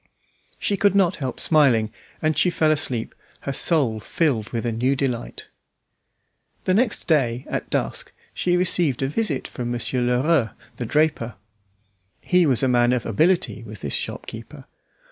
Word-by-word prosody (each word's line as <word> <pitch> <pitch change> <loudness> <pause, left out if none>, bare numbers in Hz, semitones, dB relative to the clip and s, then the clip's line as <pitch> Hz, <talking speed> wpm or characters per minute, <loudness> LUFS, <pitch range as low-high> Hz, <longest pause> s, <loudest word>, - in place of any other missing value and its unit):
She 200 - 0
could 200 0 +3
not 190 -2 +3
help 130 -5 -4
smiling, 125 -9 +3 0.3
and 155 0 +2
she 180 - +3
fell 155 -3 +2
asleep, 130 -7 0 0.3
her 140 - -3
soul 135 -9 +2
filled 120 -2 -1
with 115 0 -3
a 120 - 0
new 125 +5 +1
delight. 125 -3 -3 1.1
The 185 - +1
next 225 +2 +1
day, 130 -6 +1
at - - -4
dusk, - - -2 0.2
she 180 0 +1
received 170 -7 +1
a - - +1
visit 150 -2 -1
from 120 -1 -5
Monsieur 120 +1 -2
Lherueux, 125 +1 +1 0.2
the 120 - -4
draper. 150 -5 +1 0.8
He 180 -2 +3
was 130 -2 +2
a - - +4
man 120 -1 +3
of 125 -3 -1
ability, 160 - +1
was 110 -4 -10
this 70 - -4
shopkeeper. - - -6
135 Hz, 155 wpm, -23 LUFS, 120-165 Hz, 1.1 s, a